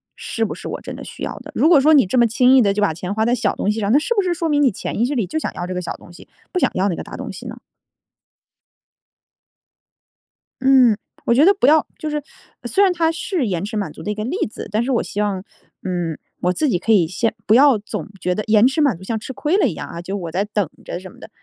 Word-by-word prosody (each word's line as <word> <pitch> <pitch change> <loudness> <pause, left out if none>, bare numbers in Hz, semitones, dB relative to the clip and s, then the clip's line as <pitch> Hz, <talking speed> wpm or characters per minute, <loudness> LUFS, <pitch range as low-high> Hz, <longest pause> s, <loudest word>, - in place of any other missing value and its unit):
是 225 - -3
不 - - -5
是 - - -8
我 - - -4
真 - - -7
的 - - -9
需 - - -9
要 - - -4
的？ - - -11
如 - - +3
果 320 -5 +6
说 310 +3 +5
你 280 -7 +6
这 190 +8 -1
么 240 - +6
轻 250 +3 +4
易 260 - +7
地 200 -3 +2
就 210 - -1
把 200 -6 +2
钱 180 +4 -5
花 220 +1 0
在 240 +2 +2
小 245 - 0
东 - - -1
西 215 +1 -1
上， 200 - 0
那 275 - +5
是 395 +10 -1
不 410 - +3
是 365 -2 0
说 335 -1 -2
明 290 -2 +2
你 265 - +4
潜 - - -5
意 225 - +2
识 270 - -2
里 230 -9 -1
就 315 - -3
想 - - -3
要 175 - -4
这 185 - -4
个 180 - -3
小 175 - -4
东 175 - -16
西， - - -15 0.2
不 365 - +1
想 - - +2
要 190 +2 +1
那 175 - -1
个 - - -6
大 - - -9
东 - - -6
西 - - -10
呢？ - - -9 3.0
嗯， 260 -4 +5 0.3
我 - - +3
觉 265 +5 +5
得 390 +5 +6
不 - - +1
要 310 +1 +5
就 310 - -4
是 300 0 -2 0.4
虽 400 - +2
然 380 -2 +4
它 330 -2 +1
是 330 - -2
延 180 -1 -2
迟 210 - -6
满 205 - -2
足 - - -11
的 210 - -2
一 - - -3
个 215 - -4
例 290 - -3
子， 220 - -8
但 215 +3 +1
是 265 - -2
我 240 - +2
希 205 - -6
望， 200 -3 -1 0.4
嗯， 175 -4 -2 0.2
我 180 +1 +1
自 300 +8 0
己 185 - +2
可 225 - -1
以 185 -7 +4
先 225 +7 -1
不 215 - +5
要 275 -1 +6
总 205 - -6
觉 180 0 0
得 215 - -2
延 215 0 +5
迟 285 +5 -1
满 280 -8 +3
足 175 - -13
像 220 +3 -3
吃 265 - -7
亏 295 +7 0
了 405 - +3
一 200 - -2
样 - - -7
啊， 170 - -7
就 190 +3 -5
我 170 -5 -5
在 190 +4 0
等 205 -5 -1 0.2
着 - - -5
什 185 0 -10
么 - - -18
的， - - -11
225 Hz, 315 characters per minute, -20 LUFS, 195-290 Hz, 3.0 s, 易